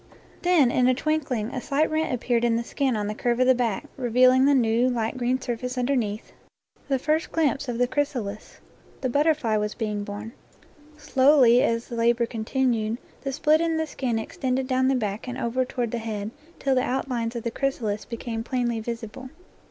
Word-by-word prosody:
Then 340 -9 +4
in 250 0 +3
a 255 - +4
twinkling 270 -6 -1
a 255 - -3
slight 295 +4 0
rent 315 -1 0
appeared 240 -1 0
in 235 -1 +3
the 230 - 0
skin 265 0 -1
on 210 -1 -1
the 210 - -2
curve 240 +2 -1
of 255 - +4
the 260 - +6
back, 235 -5 -1
revealing 255 +1 +4
the 285 0 +5
new 235 0 +3
light 230 -2 -1
green 255 +1 0
surface 250 0 -4
underneath, 245 -5 -1 0.6
the 275 -1 +1
first 310 +4 0
glimpse 285 -4 0
of 235 - -2
the 245 0 +2
chrys 290 +2 -1
alis. 210 -3 -6 0.4
The 260 - 0
butterfly 290 -6 +2
was 210 0 -2
being 210 -3 -2
born. 205 +2 -7 0.7
Slowly, 265 -4 +5
as 230 +1 0
labor 235 0 +2
continued, 230 -1 -1 0.2
the 275 - -3
split 305 +3 +3
in 330 -1 0
the 320 - 0
skin 255 -6 -2
extended 255 +4 -2
down 260 0 +2
the 270 - +3
back 215 -1 -3
and 250 0 -4
over 245 +2 0
toward 245 -3 -3
the 235 - -2
head 215 -2 -4 0.3
till 275 - 0
the 255 - +3
outlines 250 -3 -2
of 235 - -4
the 235 - -2
chrysalis 225 -6 -2
became 230 -1 -5
plainly 240 -2 -1
visible. 235 +3 -6
245 Hz, 190 wpm, -25 LUFS, 230-265 Hz, 0.7 s, the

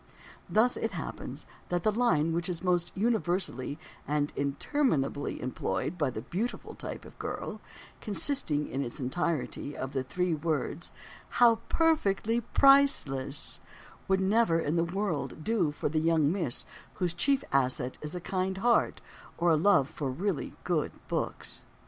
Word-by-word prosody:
Thus 235 +4 +3
it - - -2
happens - - -6 0.2
that 175 -1 0
the 215 - +3
"Line" 165 -9 +2
which 170 +1 -1
is 175 0 -4
most 175 -1 +1
universally 180 - 0 0.3
and 145 0 0
interminably 145 - 0
employed 120 - -2
by 145 - +2
the 115 -3 -5
"beautiful" 215 - -3
type - - -7
of - - -14
girl - - -4 0.4
(consisting, 205 - +1
in 135 +1 -2
its 120 - -6
entirety, 145 0 -2
of 130 +1 -4
the 135 -2 0
three 180 +6 0
words 155 0 -2 0.5
"How 235 -2 +7
perfectly 235 -8 +2
priceless") 210 - +4 0.5
would 190 0 +2
never 190 -3 +3
in 160 0 0
the 165 - +3
world 170 -4 -2
do 210 -7 +2
for 145 - -2
the 155 +2 +1
young 160 -2 +3
miss 170 -10 -2 0.3
whose 180 -3 -1
chief 270 +10 +2
asset 130 -1 +1
is 150 +3 -5
a - - -2
kind 190 +1 -2
heart 235 +4 +2 0.4
or 170 0 +3
a - - +6
love 160 -4 +4
for 140 -2 -4
really 175 +5 -2
good - - 0 0.2
books. - - -2
170 Hz, 150 wpm, -30 LUFS, 145-205 Hz, 0.5 s, How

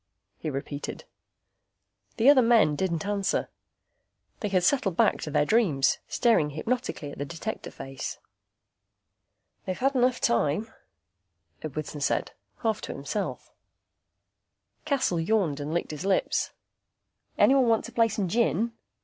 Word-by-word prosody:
he 155 - -3
repeated. 140 +1 -5 1.1
The 230 +2 +3
other 280 -2 +8
men 230 -10 +4
didn't 170 0 -1
answer. 200 -1 0 0.9
They 210 - -2
had 185 -2 +2
settled 195 -5 +2
back - - +3
to - - -4
their 150 0 +2
dreams, 165 - +2
staring 225 -11 +3
hypnotically 160 - -3
at - - -11
the 145 - -2
Detector 170 +8 -5
face. 135 -1 -6 1.5
"They've 185 - -2
had 270 +2 +1
enough 250 -1 +2
time," 145 - +1 0.9
Edwardson 155 0 -5
said, - - 0 0.3
half 220 -2 0
to - - -5
himself. 145 +9 -4 1.3
Cassel 265 - +1
yawned 165 -5 +1
and 145 +1 -4
licked 170 0 -1
his 150 +2 -6
lips. 195 -1 +1 0.9
"Anyone 265 -2 +5
want 225 -1 +2
to - - -8
play 230 -1 +3
some 205 -3 -2
gin?" 230 +2 +1
190 Hz, 130 wpm, -27 LUFS, 150-230 Hz, 1.5 s, other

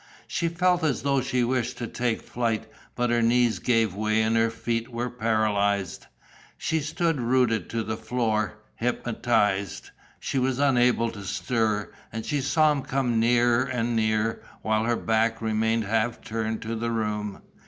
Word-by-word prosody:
She 170 - -1
felt 175 +1 +2
as 150 -4 0
though 140 -1 +2
she 125 -1 0
wished 125 0 -1
to 120 - -3
take 120 0 -2
flight, 115 -3 -2 0.3
but 120 0 0
her 120 0 +3
knees 120 0 +3
gave 115 -5 +2
way 110 +2 +1
and 110 +1 +1
her 115 0 +3
feet 115 +1 -3
were 120 0 -3
paralysed. 105 -4 0 0.5
She 160 - 0
stood 160 -1 -1
rooted 120 -4 +1
to 115 -1 -2
the 110 +1 -3
floor, 110 -2 -1 0.2
hypnotized. 110 -5 0 0.3
She 135 - -1
was 130 0 0
unable 125 -4 +3
to 100 -2 -9
stir. 110 0 -1 0.2
And 110 0 -5
she 145 -1 0
saw 155 +3 +3
him 145 -2 -1
come 130 -4 0
nearer 120 +1 +4
and 120 -3 -1
nearer, 110 0 +1 0.2
while 110 0 +1
her 120 0 +2
back 115 0 +1
remained 110 0 +1
half 110 +3 0
turned 110 0 -3
to 115 +1 -3
the 115 +1 -2
room. 105 -3 -2
115 Hz, 165 wpm, -26 LUFS, 110-125 Hz, 0.5 s, nearer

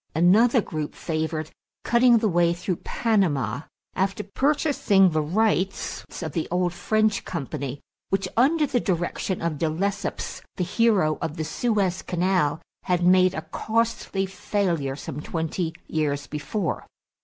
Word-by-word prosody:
Another 220 - +5
group 155 -6 -5
favored 155 -1 -3 0.3
cutting 240 0 +5
the 220 -1 +1
way 170 -2 +3
through 180 0 -2
Panama 150 - 0 0.3
after 195 +2 -1
purchasing 210 - +3
the 155 0 +1
rights 195 +3 0 0.2
of 160 - -3
the 160 +2 -2
old 180 0 0
French 215 +4 +1
company 140 -4 -4 0.3
which, 195 0 0
under 300 +6 +4
the 265 -3 0
direction 180 -1 -2
of 160 -4 -1
De 160 - +1
Lesseps, 195 +6 -3
the 180 - -1
hero 190 -6 +2
of 155 - -3
the 160 - -1
Suez 195 +1 0
Canal, 180 -4 +1 0.3
had 180 -1 +1
made 185 +1 +5
a - - -4
costly 225 -3 -1
failure 180 -7 -1
some 145 0 -6
twenty 160 +1 -2 0.2
years 145 -2 -1
before. 150 +5 -3
180 Hz, 135 wpm, -25 LUFS, 155-210 Hz, 0.3 s, Another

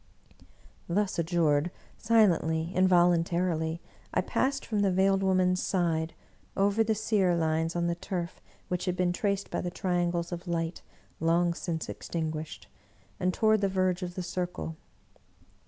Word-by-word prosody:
'* - - -29
Thus 205 -4 0
adjured, 165 -2 +2 0.3
silently, 170 -7 +2
involuntarily, 175 -2 +2 0.3
I - - +2
passed 275 +1 -1
from 215 -2 -1
the 200 -1 +3
Veiled 195 +1 +3
Woman's 185 -1 +2
side, 165 -3 0 0.4
over 200 +3 +3
the 220 0 +1
sear 205 -4 +2
lines 160 0 0
on 170 0 0
the 170 - +1
turf 175 -1 -5 0.3
which 180 0 -2
had 180 -1 0
been 180 -1 +1
traced 200 +1 -1
by - - -1
the 175 - -2
triangles 175 -1 -1
of 175 +1 -6
light 165 0 -2 0.4
long 170 +2 +2
since 165 -2 -3
extin 160 -2 -4
guished, 155 0 -7 0.5
and 185 - +1
toward 215 +2 +3
the 195 - +2
verge 185 -1 +1
of 175 -1 -5
the 185 - -3
circle. 175 -2 -4
175 Hz, 150 wpm, -29 LUFS, 170-190 Hz, 0.5 s, the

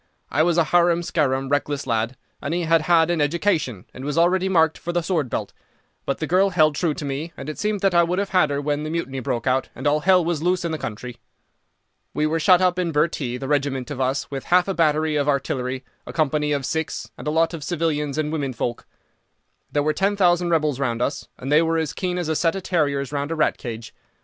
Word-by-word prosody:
I 145 - +2
was 170 +1 +2
a 170 - +5
harum 175 +1 +3
scarum, 135 -5 0
reckless 145 0 -1
lad, 115 +1 -1 0.2
and 150 +4 -2
he 175 - 0
had 165 -1 +3
had 165 +1 +3
an 170 -3 0
education, 145 - 0
and 130 - -9
was 145 +2 -3
already 185 +3 +3
marked 160 -4 +3
for 175 - -4
the 175 -1 0
sword 160 -7 -1
belt. - - -4 0.5
But 140 - 0
the 160 - -2
girl 185 +5 +3
held 155 -5 +3
true 155 0 0
to 150 - -5
me, 145 +5 -4
and 135 - -7
it 155 - -6
seemed 210 -2 -1
that 195 -2 +2
I 170 - +6
would 175 +2 0
have 200 0 -1
had 180 -5 +3
her 140 0 -1
when 145 0 -1
the 155 - -4
Mutiny 155 -5 -3
broke 120 -2 -3
out, 130 0 +1
and - - -8
all 145 +1 +3
hell 180 +1 +4
was 165 -3 -1
loose 180 +1 +1
in 170 - -1
the 160 - -3
country. 120 +3 -6 1.0
"We 150 - +1
were 160 +2 0
shut 180 +2 +5
up 180 -1 +2
in 175 -2 0
Bhurtee, 150 -5 0
the 135 - -6
regiment 140 -2 -1
of 135 -2 -4
us 130 +3 -1
with 135 -1 -5
half 180 +1 +3
a 195 - 0
battery 155 -2 +2
of 145 0 +1
artillery, 130 -2 -2 0.2
a - - -7
company 150 -1 +1
of 140 -2 -1
Sikhs, 160 +3 -3
and - - -9
a - - +2
lot 165 +2 +2
of 160 -3 -6
civilians 150 -3 -1
and 155 -1 -1
women 140 -4 -2
folk. 120 0 -4 0.8
There 145 - +1
were 155 +1 +1
ten 195 +4 +1
thousand 175 -2 +3
rebels 155 -5 +1
round 120 -3 0
us, 140 +2 -3
and 135 +3 -5
they 150 +2 +6
were 165 0 +1
as 160 -3 -1
keen 180 -2 -2
as 175 -3 -2
a 160 - 0
set 165 +3 +1
of 195 - -5
terriers 145 -7 0
round 145 0 -2
a 165 - -2
rat 155 -1 +1
cage. 115 -2 -7
155 Hz, 245 wpm, -23 LUFS, 140-170 Hz, 1.0 s, I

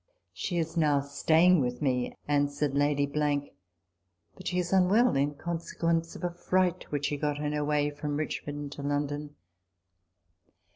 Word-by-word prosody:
" - - -51
She 175 - -3
is 165 -1 -2
now 150 -3 +3
staying 160 +5 +4
with 125 -1 -2
me," 125 -4 0
answered 145 0 +1
Lady, 145 0 +2
" 90 - -5
but - - -9
she 180 - -1
is 180 0 -1
unwell 200 +6 +4
in 145 +2 +1
conse 170 +2 -5
quence 165 0 0
of - - -9
a 175 - 0
fright 180 0 0
which 145 -1 -1
she 145 - -1
got 145 0 -1
on 150 0 -1
her 150 0 -1
way 145 0 +1
from 145 0 -3
Richmond 145 -1 -4
to 145 - -7
London." 145 +1 -2
145 Hz, 165 wpm, -29 LUFS, 140-165 Hz, -, staying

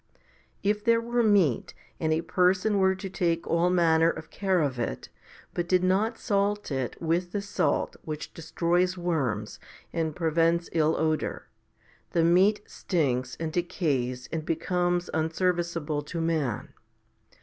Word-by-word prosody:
1 - - -34 0.4
If 210 +1 +1
there 230 0 +4
were 240 +1 0
meat, 200 - +2 0.2
and 160 -1 0
a 160 +1 +2
person 185 +4 +2
were 190 0 +3
to 190 +1 -6
take 170 -3 -1
all 170 +1 +2
manner 165 -2 +4
of 160 -1 -6
care 190 -2 +1
of 140 -5 -1
it, 120 - -3 0.4
but 175 0 -3
did 185 -1 +3
not 205 +5 +1
salt 205 -3 0
it 130 -3 -3
with 170 +2 -1
the 205 - 0
salt 195 -6 -1
which 155 -1 -6
destroys 175 +3 0
worms 135 -12 -2 0.3
and 160 -3 -1
prevents 165 0 +1
ill 160 -1 +2
odour, 155 -1 -1 0.7
the 165 - +3
meat 190 +5 +4
stinks 130 -8 -1
and 160 -1 -3
decays 135 -8 -1
and 160 -1 -2
becomes 175 +2 0
unservice 170 +2 0
able 150 -1 -2
to 165 +3 -6
man. 155 -8 -1
170 Hz, 150 wpm, -27 LUFS, 155-185 Hz, 0.7 s, there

